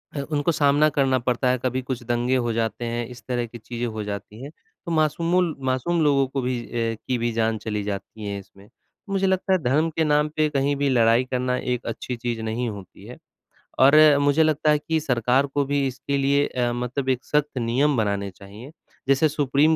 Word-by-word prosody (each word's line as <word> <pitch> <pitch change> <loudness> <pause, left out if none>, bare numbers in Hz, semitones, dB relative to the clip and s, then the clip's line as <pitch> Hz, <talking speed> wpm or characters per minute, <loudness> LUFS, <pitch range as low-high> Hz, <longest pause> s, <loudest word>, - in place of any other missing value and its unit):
अ, - - -2
उनको 145 +2 +1
सामना 145 0 +3
करना 130 -1 +3
पड़ता 125 +1 0
है, 125 - +2
कभी 130 +1 0
कुछ 125 -1 -5
दंगे 120 +2 0
हो 120 -2 0
जाते 115 +1 -2
हैं, 120 0 -3
इस 125 -2 -12
तरह 120 -2 -1
की 120 +1 -10
चीज़ें 120 +1 -5
हो 110 -2 -5
जाती 105 +2 -7
हैं, 140 - -8 0.3
तो 170 - -4
मासूमों 165 +3 +2
ल - - -8
मासूम 130 +7 0
लोगों 140 -2 +3
को 135 +1 -3
भी 125 -1 -1
अ, - - -17 0.4
की 130 - 0
भी 120 0 -1
जान 115 -1 0
चली 105 -1 -4
जाती 100 +1 -6
है 100 0 -3
इसमें। 100 +1 -17 0.4
मुझे 195 -1 +1
लगता 190 0 +1
है 185 - +3
धर्म 150 +6 +2
के 160 - +2
नाम 150 0 +2
पे 155 0 +2
कहीं 140 0 0
भी 140 0 0
लड़ाई 115 -1 +4
करना 125 0 0
एक 125 -2 -3
अच्छी 115 +2 -4
चीज़ 115 -1 -3
नहीं 110 +2 -2
होती 100 -3 -10
है - - -10 0.6
और 135 +3 +6 0.2
मुझे 145 +2 +3
लगता 155 -1 +2
है 150 - +3
कि 160 +2 -1
सरकार 125 -2 +1
को 140 +1 0
भी 140 0 0
इसके 135 +2 -3
लिए 140 +1 +2
अ, 120 -1 -1
मतलब 125 +2 -3
एक 130 -1 0
सख़्त 150 -2 0
नियम 130 +4 +1
बनाने 100 -2 -1
चाहिए। 100 +8 -12 0.4
जैसे 140 +3 +4
सुप्रीम 145 +2 +2
130 Hz, 215 wpm, -23 LUFS, 115-145 Hz, 0.6 s, और